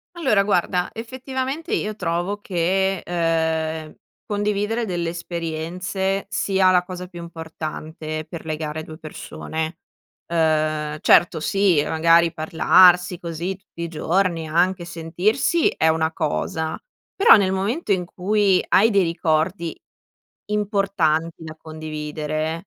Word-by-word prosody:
Allora, 215 -12 +3
guarda 180 -2 0
effettivamente 260 - -5
io 215 - -1
trovo 180 +2 -2
che, 190 +1 0
ehm, 160 -2 -1 0.3
condividere 210 +2 -1
delle 175 -4 -2
esperienze 175 +3 -3
sia 190 -2 +2
la 180 -1 +4
cosa 180 0 -7
più 175 -2 -10
importante 160 -1 -6
per 170 -3 -8
legare 155 0 -4
2 155 0 -10
persone. 160 +1 -6 0.5
Uhm, 155 -2 0
certo 175 +1 +5
sì, 195 -3 +2
magari 165 +1 +4
parlarsi 180 +3 +4
così 170 +3 -4
tutti 190 -3 -11
i 170 - -2
giorni, 165 0 0
anche 175 +3 +1
sentirsi, 180 - +1
è 160 - +1
una 160 0 +1
cosa. 160 0 -2 0.4
Però, 395 - +8
nel 190 -3 +2
momento 205 - -1
in 180 -2 0
cui 195 +1 +1
hai 220 +4 +5
dei 200 -2 +4
ricordi 165 +1 -1 0.7
importanti 195 -7 0
da 155 0 -8
condividere, 155 +1 -4
170 Hz, 115 wpm, -22 LUFS, 160-195 Hz, 0.7 s, Però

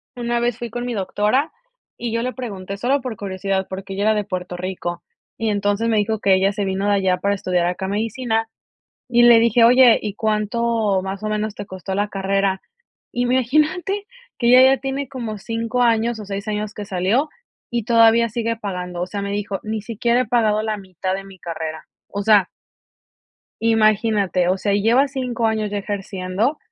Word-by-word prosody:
una 240 -1 -1
vez 240 -1 0
fui 240 -1 -5
con 240 +2 -4
mi 245 - -3
doctora 210 - 0 0.5
y 235 - -4
yo 230 - 0
le 250 +1 -2
pregunté 200 -6 -6
solo 265 +6 +1
por 250 -3 -5
curiosidad, 195 -1 -2
porque 195 +1 -6
ella 200 +1 -2
era 220 +1 +4
de 210 -1 0
Puerto 180 -2 -5
Rico, 175 -1 -4 0.3
y 225 -1 -1
entonces, 205 +2 0
me 220 - +2
dijo: 215 +1 0
"Que 195 -2 +3
ella 190 +1 +3
se 205 0 -2
vino 190 +1 -1
de 205 - +3
allá 190 -2 +2
para 200 +1 0
estudiar 180 -2 0
acá 190 +2 -3
medicina", 225 +2 -1 0.6
y 240 0 +4
le 240 -1 +8
dije: 230 0 +4
"Oye, 245 0 +7
¿y 210 -2 -4
cuánto 215 -1 0
más 195 +2 -5
o - - -1
menos 215 0 -2
te 205 - -6
costó 190 0 -6
la 205 +1 0
carrera?", 195 -1 0 0.5
imagínate 305 - +1 0.3
que 235 - 0
ella 260 +2 +7
ya - - -10
tiene 270 +1 -3
como 230 -5 -5
5 230 +3 -2
años 230 0 +2
o 210 - -7
6 200 +1 -5
años 210 0 -3
que 210 - -6
salió, 200 +10 0 0.4
y 235 -3 -1
todavía 230 0 +5
sigue 230 0 -2
pagando, 180 -4 -5
o 180 - -2
sea, 200 +2 -4
me 200 0 -3
dijo: 200 -1 -3
"Ni 215 0 -3
siquiera 235 +3 0
he - - -2
pagado 215 -2 +2
la 215 -1 -2
mitad 185 -1 -4
de 195 - -6
mi 195 -1 -14
carrera". 160 -2 -5 0.2
O 200 - -3
sea 205 -3 +4 1.1
imagínate, 215 -4 +2
o 185 +1 +2
sea, 200 +1 0
y 200 - +2
lleva 240 +6 +4
5 250 -4 -2
años 220 -1 0
ya 205 - -3
ejerciendo 195 +5 -2
215 Hz, 195 wpm, -21 LUFS, 195-235 Hz, 1.1 s, le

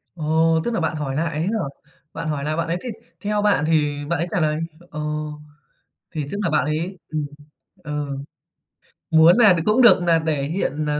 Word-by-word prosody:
Ồ, 160 +1 +2
tức 240 - -1
là - - 0
bạn 160 -1 -1
hỏi 140 -3 -3
nại 165 +2 0
ấy 155 - -2
hả? 215 +6 0 0.5
Bạn 165 0 -5
hỏi 145 -2 -2
lại 155 +1 -1
bạn 165 - -1
ấy 170 - -1
thì 250 - -5 0.3
theo 210 0 -1
bạn 205 -7 +2
thì 150 -2 +1
bạn 170 - 0
ấy 170 - -1
trả - - 0
lời 155 0 +1 0.3
ờ, 155 - -6 1.1
thì 155 -4 -3
tức 200 - -3
là 170 - +1
bạn 155 - +2
ấy 165 +5 -2
ừm, 155 -2 -1 0.6
ờ, 150 -1 -3 1.0
muốn 160 +5 +7
nà 215 -6 +7
đ 170 - 0
cũng 215 +5 +4
được 235 -6 +7
nà 170 -2 +3
để 150 -3 0
hiện 155 -1 -2
nà 150 0 0
160 Hz, 205 wpm, -22 LUFS, 150-180 Hz, 1.1 s, muốn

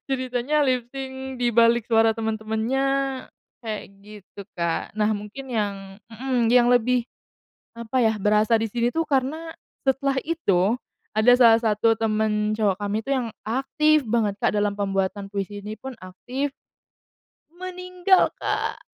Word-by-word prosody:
Ceritanya 260 +2 0
lip 255 -4 +1
sync 265 -1 -6
di 240 - +3
balik 235 0 +3
suara 225 -1 +4
temen-temennya 220 +3 -1 0.8
kayak 215 -2 -3 0.2
gitu, 205 -1 -12
Kak. 170 +2 -2
Nah, 215 0 +1
mungkin 215 +6 -9
yang 200 -4 -3
mhm, 245 0 -1
yang 245 -1 +5
lebih 245 0 +3 0.8
apa 235 +2 0
ya, 220 -1 +3
berasa 210 +2 +3
di 225 - -1
sini 235 +3 0
tuh 330 - 0
karena 300 +4 -1 0.4
setelah 270 +1 +1
itu, 205 - +1 0.4
ada 215 +3 +5
salah 230 -2 +6
satu 225 0 +2
temen 215 -1 0
cowok 205 -3 +1
kami 205 +1 -1
itu 275 - -3
yang 245 -3 -2 0.2
aktif 300 +5 +2
banget, 215 -3 +1
Kak, - - +2
dalam 205 0 +1
pembuatan 195 0 -2
puisi 205 0 -4
ini 215 +1 -6
pun 265 0 -7
aktif, 250 +10 -4 1.0
meninggal, 365 +1 +1
Kak. - - -2
230 Hz, 140 wpm, -24 LUFS, 210-265 Hz, 1.0 s, salah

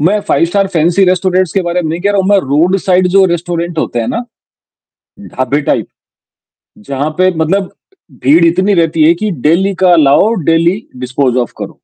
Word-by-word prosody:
मैं 200 +7 +1
5 - - +2
star 195 +3 0
fancy 175 +2 +1
restaurants 185 -1 0
के 195 - 0
बारे 175 +1 -2
में 160 - -3
नहीं 165 - -4
कह 200 +3 0
रहा 200 -1 +1
हूँ, 190 - -2
मैं 205 -1 +4
रोड 160 +7 +1
साइड 185 -1 +1
जो 195 +1 +3
रेस्टोरेंट 170 -1 -4
होते 120 - -2
हैं 115 - -3
ना, 240 +1 -3 1.0
ढाबे 145 -6 -3
टाइप - - -1 1.0
जहाँ 140 +2 -2
पे 185 0 +3
मतलब 185 +5 -1 0.5
भीड़ 155 +6 +4
इतनी 185 +4 +1
रहती 165 -2 +1
है 170 - +5
कि 210 +3 -3 0.2
डेली 190 +5 +1
का 180 -2 +5
लाओ 155 +8 +3 0.2
डेली 170 +5 +1
डिस्पोज़ 130 0 -2
ऑफ 120 - -2
करो। - - -8
175 Hz, 190 wpm, -12 LUFS, 155-190 Hz, 1.0 s, है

